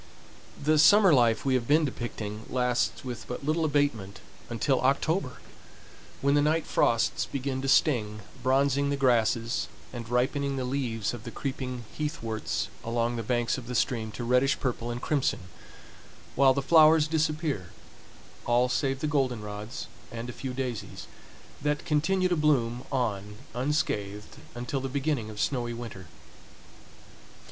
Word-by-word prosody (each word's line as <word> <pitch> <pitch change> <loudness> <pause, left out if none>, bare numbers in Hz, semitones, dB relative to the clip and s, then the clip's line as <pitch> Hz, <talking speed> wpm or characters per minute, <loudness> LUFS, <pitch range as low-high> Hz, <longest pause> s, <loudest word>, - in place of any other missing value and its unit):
The 155 +1 +2
summer 195 +3 +7
life 120 -3 +3
we 135 - +2
have 120 -2 0
been 155 +2 +4
depicting 110 -4 -5
lasts 125 0 0
with 120 -2 -6
but 125 +3 -6
little 160 +2 +1
abatement 140 -10 0 0.3
until 125 +3 +1
October, 140 +2 +1 0.9
when 140 0 +3
the 145 - +4
night 155 +2 +1
frosts 115 -1 +1
begin 135 -1 -3
to 135 - -3
sting, 110 -7 +2 0.2
bronzing 140 +2 +2
the 140 - 0
grasses, 120 -3 +2 0.3
and 115 -2 -7
ripening 135 +3 0
the 130 - -2
leaves 125 -5 -2
of 120 -3 -7
the 120 - -6
creeping 125 -2 -4
heathworts 115 -8 -3
along 115 +1 0
the 115 - -2
banks 120 +2 0
of 120 - -11
the 125 - -4
stream 115 -4 0
to 120 - -5
reddish 125 +3 +2
purple 120 -2 -2
and 120 +1 -5
crimson; 145 -9 0 0.9
while 135 -1 +5
the 140 - -1
flowers 155 0 +6
disappear, 155 - -1 0.8
all 120 +1 +3
save 135 +1 0
the 155 - 0
goldenrods 120 -5 -2 0.3
and 120 +1 -5
a - - -12
few 130 +1 -5
daisies, 125 -3 -5 0.6
that 150 0 -1
continue 185 +5 +2
to 180 - +1
bloom 125 -6 +1
on 105 -6 -2 0.2
unscathed 105 -7 -2 0.2
until 125 +3 -3
the 135 - -3
beginning 135 -4 -1
of 105 -1 -8
snowy 120 -3 -1
winter. 115 -6 -8
130 Hz, 145 wpm, -28 LUFS, 115-145 Hz, 0.9 s, summer